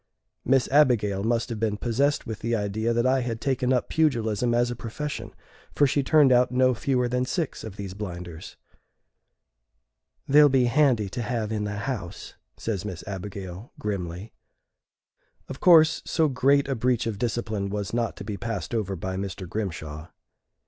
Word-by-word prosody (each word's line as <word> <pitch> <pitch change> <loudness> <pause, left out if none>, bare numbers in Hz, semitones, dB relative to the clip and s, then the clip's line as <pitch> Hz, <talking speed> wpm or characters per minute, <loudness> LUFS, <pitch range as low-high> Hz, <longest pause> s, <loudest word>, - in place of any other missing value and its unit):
Miss 135 0 +3
Abigail 115 -9 +3
must 115 +2 0
have 115 -2 -4
been 105 -2 0
possessed 135 +6 0
with 110 -2 -5
the 115 +1 -1
idea 110 +2 -1
that 120 +1 +1
I 130 +1 +3
had 115 -2 -3
taken 130 -2 0
up 125 -2 +1
pugilism 120 -7 +1
as 120 +1 +2
a - - -4
profession, 140 +6 -5 0.4
for 145 - +4
she 140 +1 +2
turned 140 0 +5
out 125 0 +4
no 130 0 +3
fewer 125 0 0
than 125 +1 0
six 160 +4 -3
of 110 -4 -7
these 100 -2 -6
blinders. 90 -5 -7 1.7
"They'll 145 +1 +7
be 130 -2 +3
handy 120 -4 +3
to 120 - -4
have 115 -2 -2
in 105 -1 -1
the 105 0 -4
house," 105 -10 -5 0.2
says 105 -5 -3
Miss 95 -5 -6
Abigail, 95 +1 -7
grimly. 95 0 -4 1.1
Of - - -8
course, 160 -3 +6
so 160 -1 +1
great 140 +1 +2
a 135 - 0
breach 125 0 0
of 110 -3 -3
discipline 110 -4 -2
was 105 0 -4
not 120 -1 -1
to - - -7
be 100 0 -5
passed 100 -1 -4
over 100 -4 -1
by 95 +1 -4
Mr. 95 -1 -5
Grimshaw. 80 -6 -5
115 Hz, 170 wpm, -26 LUFS, 100-130 Hz, 1.7 s, They'll